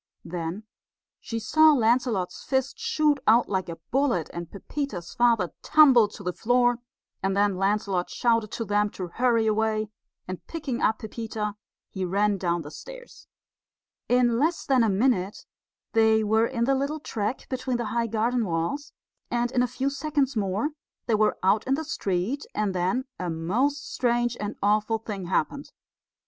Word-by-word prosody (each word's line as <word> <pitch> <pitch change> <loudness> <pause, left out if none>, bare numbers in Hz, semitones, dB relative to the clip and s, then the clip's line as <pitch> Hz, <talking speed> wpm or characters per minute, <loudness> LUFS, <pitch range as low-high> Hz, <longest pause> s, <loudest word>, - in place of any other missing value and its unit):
Then 170 +4 -4 0.6
she 230 - -5
saw 310 +7 +5
Lancelot's 230 -7 +1
fist 265 - -1
shoot 310 -11 +1
out 230 +3 +5
like 190 -3 -2
a 165 - -4 0.2
bullet, 250 - +1
and 170 -1 -6
Pepita's 200 - -5
father 230 -8 +2
tumble 270 -8 +6
to 205 0 -11
the 180 -1 -2
floor; 245 +2 +2 0.4
and 195 +1 0
then 205 -1 +3
Lancelot 195 -1 0
shouted 230 -3 +1
to 230 - -3
them 205 0 +1
to 180 -2 -4
hurry 235 +2 +2
away, 215 0 +1 0.4
and 185 -1 -6
picking 285 -7 -4
up 220 - +2
Pepita, 220 -1 -4 0.4
he 190 - -4
ran 200 +2 +1
down 170 -2 -1
the 145 - -9
stairs. - - -12 0.8
In 245 -1 +3
less 325 +4 0
than 265 -4 +3
a 225 - +2
minute 200 -2 0 0.5
they 220 -1 +4
were 220 +2 +3
in 235 -2 -2
the 270 +3 +3
little 280 +3 -1
track 225 -3 -3
between 255 -1 -2
the 240 - -3
high 235 -1 +1
garden 230 +2 0
walls; 175 - -2 0.4
and 240 0 0
in 250 - +2
a 250 - +2
few 270 +3 -2
seconds 285 -2 -1
more 205 +6 0 0.4
they 235 - 0
were 215 0 +2
out 200 +3 +3
in 265 - +3
the 315 - -3
street, 205 - -2
and 210 -2 0
then 185 +9 0
a 180 - -2
most 230 - -1
strange 240 -1 +1
and 210 0 -4
awful 210 +2 +2
thing 210 -4 -6
happened. 190 - -1
225 Hz, 165 wpm, -26 LUFS, 195-255 Hz, 0.8 s, tumble